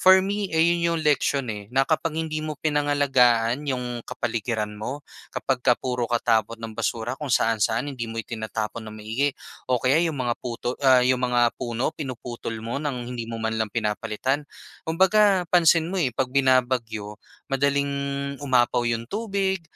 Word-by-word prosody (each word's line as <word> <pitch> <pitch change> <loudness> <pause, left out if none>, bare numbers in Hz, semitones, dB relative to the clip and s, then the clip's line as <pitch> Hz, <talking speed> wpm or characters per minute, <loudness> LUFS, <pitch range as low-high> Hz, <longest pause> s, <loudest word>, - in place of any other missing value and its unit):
For 190 0 +8
me 200 +1 -2
ayon, 170 +2 +3
'yong 170 -1 +1
leksyon 140 -3 +1
eh, 105 -1 -7
na 135 - +5
kapag 160 0 0
hindi 160 -1 -2
mo 155 -1 -3
pinangalagaan 140 -4 +2
'yong 125 -3 -3
kapaligiran 110 -2 -2
mo, 135 +7 -5 0.3
kapag 130 -2 -1
ka 125 - +5
puro 125 -2 -2
ka 120 - +2
tapon 115 -1 +1
ng 115 - -5
basura 115 +1 -2
kung 150 -2 -5
saan-saan, 115 +4 +1
hindi 120 -3 -4
mo 115 - -7
itinatapon 110 0 -4
nang 110 - -8
maigi 125 +7 -1 0.4
o 125 - +3
kaya 135 +5 +4
'yong 160 - -2
mga 120 -3 0
puto 120 0 -4
ah, 130 -2 +6
'yong 125 0 +3
mga 120 -1 +2
puno 120 +3 -1
pinuputol 125 -5 -6
mo 115 +4 -3
ng 130 -5 -4
hindi 115 -2 -5
mo 115 0 -5
man 110 0 -1
lang 110 -1 0
pinapalitan. 120 +6 -1 0.4
Kumbaga 190 +3 +4
pansin 165 -1 +4
mo 190 - -2
eh, 130 -8 0
'pag 130 0 -1
binabagyo 125 -6 +1 0.3
madaling 140 +1 +1 0.5
umapaw 125 -3 +2
'yong 115 0 -2
tubig, 195 -4 -1
125 Hz, 165 wpm, -24 LUFS, 115-150 Hz, 0.5 s, For